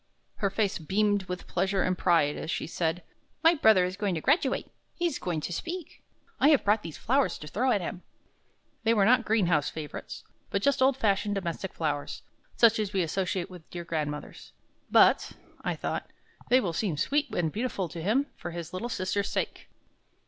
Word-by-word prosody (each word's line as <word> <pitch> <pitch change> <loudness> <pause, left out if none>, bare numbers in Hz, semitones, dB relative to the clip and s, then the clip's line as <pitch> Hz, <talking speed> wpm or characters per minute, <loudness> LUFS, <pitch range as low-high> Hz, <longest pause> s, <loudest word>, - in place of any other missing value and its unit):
Her 200 - +1
face 200 -1 0
beamed 205 +4 +1
with 180 0 -5
pleasure 190 +1 0
and 185 - +1
pride 165 -5 +3
as 160 - -6
she - - -2
said: 165 +1 -2 0.4
"My 330 +1 +7
brother 220 - +5
is 180 +1 -3
going 200 -3 0
to 160 - -3
graduate; 285 - +1 0.2
he's 345 -2 -1
going 170 -4 -2
to 175 - -4
speak. 340 - -6 0.4
I 275 - +5
have 295 -4 +5
brought 210 +1 +3
these 165 -5 -8
flowers 270 +4 +1
to 150 - -9
throw 245 - 0
at 205 - +2
him." 175 +1 -5 0.8
They 230 0 +3
were 200 -2 +4
not 245 +1 +4
greenhouse 175 -9 +2
favorites, 150 -3 -7 0.3
but 200 - -1
just 280 -1 +2
old 265 0 +4
fashioned 205 -2 +1
domestic 190 0 -3
flowers, 145 -3 -3 0.3
such 230 -1 +5
as 210 -1 -2
we 190 -2 +2
associate 185 +2 -2
with 180 -2 -10
the - - -37
dear 175 -1 -4
grandmothers. 150 -3 -5 0.4
"But," - - +5 0.3
I - - -1
thought, - - -4 0.4
"they 255 - +6
will 180 -9 -2
seem 170 -3 -1
sweet 290 - +1
and 165 -3 0
beautiful 210 -3 -2
to 165 - -7
him, 225 - +2
for - - -6
his 170 0 -7
little 230 +6 -3
sister's 195 -1 -1
sake." - - -3
195 Hz, 190 wpm, -28 LUFS, 170-225 Hz, 0.8 s, My